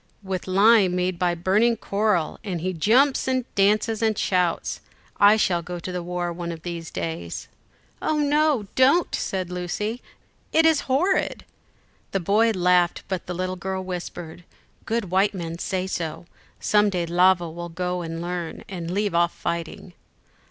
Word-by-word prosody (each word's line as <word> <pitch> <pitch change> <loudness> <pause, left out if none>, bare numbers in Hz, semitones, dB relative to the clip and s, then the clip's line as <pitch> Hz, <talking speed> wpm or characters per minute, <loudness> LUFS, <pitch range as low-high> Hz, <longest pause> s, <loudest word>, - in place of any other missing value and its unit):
"With 190 -2 -4
lime 195 -1 +5
made 180 -1 -1
by 175 -1 +1
burning 210 +7 +2
coral, 200 -6 0
and 185 -5 -3
he 185 +2 -2
jumps 250 - +3
and 255 -2 0
dances 210 +2 +2
and 220 -2 +1
shouts: 180 -2 0 0.4
I 205 +1 +6
shall 175 -5 +1
go 180 +1 -6
to 185 - -6
the 180 -1 -3
war 175 0 -3
one 170 0 -5
of 165 -1 -8
these 170 -2 -5
days." 85 0 -5 0.5
"Oh 310 - 0
no, 295 -5 +2
don't!" 275 +7 +4
said 185 -2 -2
Lucy, 210 +7 -3 0.5
"it 320 0 +4
is 320 -4 +3
horrid." 350 +9 +1 0.7
The 195 - +1
boy 210 +6 +3
laughed, 180 -3 +2
but 190 -2 -3
the 180 - -4
little 185 +1 -2
girl 190 +1 -3
whispered, 175 -2 -7 0.4
"Good 220 -5 -1
white 195 +2 +2
men 170 -2 -5
say 185 0 -2
so. 170 -3 -4 0.3
Some 210 0 +3
day 180 -3 -1
Lavo 175 0 +3
will 175 +1 -7
go 180 +1 -3
and 165 0 -5
learn, 175 -1 -4
and 175 -3 -6
leave 205 +2 -1
off 170 0 +2
fighting." 170 +1 -5
185 Hz, 160 wpm, -24 LUFS, 175-210 Hz, 0.7 s, I